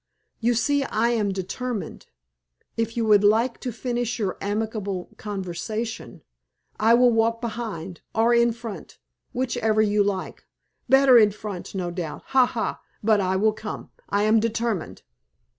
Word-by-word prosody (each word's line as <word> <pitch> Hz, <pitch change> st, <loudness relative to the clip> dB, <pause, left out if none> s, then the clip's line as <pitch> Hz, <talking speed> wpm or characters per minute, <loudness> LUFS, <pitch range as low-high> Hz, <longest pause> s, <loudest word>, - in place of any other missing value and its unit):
You 240 Hz, +1 st, +2 dB
see 285 Hz, +4 st, +2 dB
I 235 Hz, -2 st, +1 dB
am 215 Hz, -4 st, +1 dB
determined. 200 Hz, +5 st, -5 dB, 0.7 s
If 230 Hz, +1 st, -2 dB
you 230 Hz, -, +1 dB
would 210 Hz, -2 st, +5 dB
like 225 Hz, +4 st, +3 dB
to 250 Hz, -, -4 dB
finish 240 Hz, +1 st, -2 dB
your 200 Hz, -5 st, -1 dB
amiable 205 Hz, -2 st, -3 dB
conversation, 210 Hz, +3 st, -5 dB, 0.6 s
I 225 Hz, +2 st, +5 dB
will 245 Hz, 0 st, +5 dB
walk 230 Hz, 0 st, +2 dB
behind 215 Hz, -7 st, -5 dB
or 230 Hz, +2 st, +4 dB
in 235 Hz, 0 st, +4 dB
front 230 Hz, -3 st, -9 dB, 0.3 s
whichever 240 Hz, -4 st, 0 dB
you 210 Hz, -1 st, +3 dB
like. 195 Hz, -2 st, -4 dB, 0.4 s
Better 270 Hz, -2 st, +7 dB
in 210 Hz, -2 st, +6 dB
front, 205 Hz, -2 st, -7 dB
no 180 Hz, -2 st, -2 dB
doubt. 170 Hz, -3 st, -5 dB
Ha! 260 Hz, -2 st, +5 dB
ha! 230 Hz, -, -3 dB, 0.2 s
But 215 Hz, -1 st, +4 dB
I 190 Hz, 0 st, 0 dB
will 215 Hz, +3 st, +3 dB
come; 215 Hz, 0 st, -7 dB, 0.2 s
I 200 Hz, +1 st, +1 dB
am 215 Hz, +1 st, +4 dB
determined." 230 Hz, -4 st, -2 dB
220 Hz, 145 wpm, -24 LUFS, 205-235 Hz, 0.7 s, Better